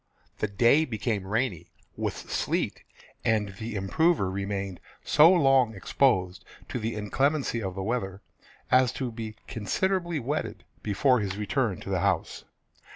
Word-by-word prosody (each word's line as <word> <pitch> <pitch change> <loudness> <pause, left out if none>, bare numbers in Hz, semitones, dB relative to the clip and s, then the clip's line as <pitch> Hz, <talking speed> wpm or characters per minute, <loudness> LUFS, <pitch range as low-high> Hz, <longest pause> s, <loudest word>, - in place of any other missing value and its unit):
The - - 0
day 115 +9 +4
became 110 -5 -2
rainy, 105 -6 -1 0.3
with - - -3
sleet, - - -1 0.4
and 110 -2 +1
the 110 0 -5
improver 100 - +1
remained 100 -1 -3 0.2
so 155 +4 +6
long 135 - +4
exposed 95 -4 +1 0.3
to - - -3
the 115 +1 -3
inclemency 120 +4 0
of 95 -3 -4
the 95 - -3
weather 100 -3 -3 0.5
as 130 -2 +5
to 130 -3 -3
be 110 -1 -6
considerably 175 - -1
wetted 140 +5 -3 0.2
before 125 +5 +2
his 100 -2 -3
return 105 - -1
to - - -6
the - - +1
house. - - -1
115 Hz, 140 wpm, -27 LUFS, 100-135 Hz, 0.5 s, so